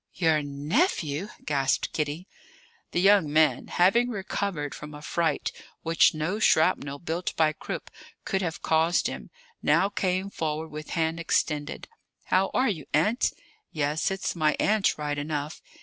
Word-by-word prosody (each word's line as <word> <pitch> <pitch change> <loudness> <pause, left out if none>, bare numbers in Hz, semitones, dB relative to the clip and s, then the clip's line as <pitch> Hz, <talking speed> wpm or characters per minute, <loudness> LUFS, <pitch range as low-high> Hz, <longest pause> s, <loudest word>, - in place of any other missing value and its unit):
"Your 160 -3 +2
nephew!" 150 - 0 0.2
gasped 135 -2 0
Kitty. 155 +4 -3 0.6
The - - -1
young 195 -5 +5
man, 155 0 +3
having 230 +8 +3
recovered 195 - -3
from 150 0 -9
a 150 - -10
fright 165 +1 0 0.3
which 165 -1 +4
no 165 +7 -2
shrapnel 155 -8 +3
built 170 +4 -3
by 155 -1 +3
Krupp - - -6 0.3
could 190 -1 0
have 165 -4 -4
caused 160 +2 +2
him, - - -4 0.3
now 195 - +3
came 190 0 -1
forward 160 -1 -3
with 150 0 -8
hand 165 0 0
extended. 150 -2 -1 0.4
"How 190 +1 +2
are 260 - +3
you, 160 -10 -3
Aunt? 210 - +2 0.4
yes, 150 +3 0
it's 195 -1 -3
my 155 -2 +2
aunt, 210 -1 +2
right 145 -1 -2
enough. 150 +1 -4
160 Hz, 145 wpm, -27 LUFS, 150-190 Hz, 0.6 s, young